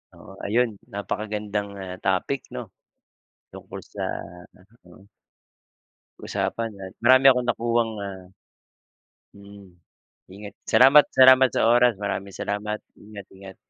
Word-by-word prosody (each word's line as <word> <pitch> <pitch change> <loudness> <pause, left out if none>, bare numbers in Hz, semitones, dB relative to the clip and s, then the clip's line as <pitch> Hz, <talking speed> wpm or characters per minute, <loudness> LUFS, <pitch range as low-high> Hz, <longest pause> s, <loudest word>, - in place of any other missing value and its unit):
Oo - - -15
ayun, 120 +4 +1 0.2
napakagandang, 105 0 -4
ah, 95 -1 -7
topic 95 +8 -1
'no - - -5 0.9
tungkol - - -10
sa - - -4 0.5
ano, 100 +5 -24 0.2
oo. 95 - -18 1.2
Usapan 115 -1 -3
at 95 - -9
marami 130 +2 +5
akong 125 -1 -1
nakuhang 115 -1 0
ah 95 -1 -7 1.2
mm. 100 0 -14 0.7
Ingat, 100 +1 -11
salamat, 135 +3 +6
salamat 130 0 +6
sa - - +1
oras, 120 0 +4
maraming 100 -1 -4
salamat 105 +2 -4 0.2
ingat, 105 -2 -12
ingat. 95 0 -12
105 Hz, 115 wpm, -24 LUFS, 100-120 Hz, 1.2 s, salamat